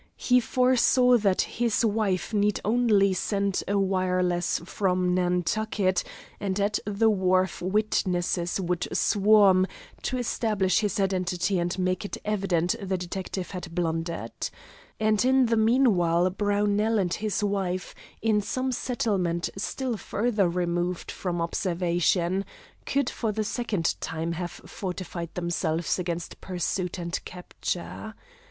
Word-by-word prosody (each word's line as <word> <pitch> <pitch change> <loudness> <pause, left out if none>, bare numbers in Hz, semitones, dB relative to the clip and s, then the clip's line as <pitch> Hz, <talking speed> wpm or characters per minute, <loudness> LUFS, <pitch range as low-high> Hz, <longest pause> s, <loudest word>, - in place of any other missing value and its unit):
He 250 0 +4
foresaw 250 0 +4
that 195 -3 +2
his 235 -2 0
friend 215 -3 0
need 205 0 +2
only 210 -4 +3
send 200 0 0
a 200 - +1
wireless 185 -2 +1
from 185 -1 0
Nantucket 185 +2 +1 0.4
and 195 -1 -2
at 205 +1 +1
the 210 +2 +2
wharf 185 -2 +1
witnesses 185 -3 0
would 180 -2 -1
swarm 200 -3 +4 0.3
to 255 - -2
establish 215 -6 +1
his 210 -2 -1
identity 190 -1 0
and 175 +1 -1
make 185 0 0
it 205 - -5
evident 190 -5 +1
the 190 -1 -1
detective 180 +1 -5
had 180 -3 -7
blundered. 165 -7 -2 0.7
And 215 0 +2
in 260 0 +4
the 230 -1 +2
meanwhile 200 -7 +3
Brownell 205 +2 +1
and 180 -3 0
his 215 -1 -1
wife, 190 -2 -1 0.3
in 215 -2 +3
some 260 +5 -2
settlement 195 -9 -1
still 240 +4 -3
further 205 -3 0
removed 175 0 -1
from 175 -2 -3
observation, 175 +1 0 0.5
would 280 -2 +2
for 225 -3 -2
the 215 +1 -1
second 210 -6 -1
time 160 +1 -3
have 175 +1 -3 0.2
fortified 180 -3 -6
themselves 170 -1 -1
against 175 -1 -4
pursuit 180 0 -2
and 170 -1 -3
capture. 180 +4 -6
190 Hz, 125 wpm, -26 LUFS, 180-215 Hz, 0.7 s, He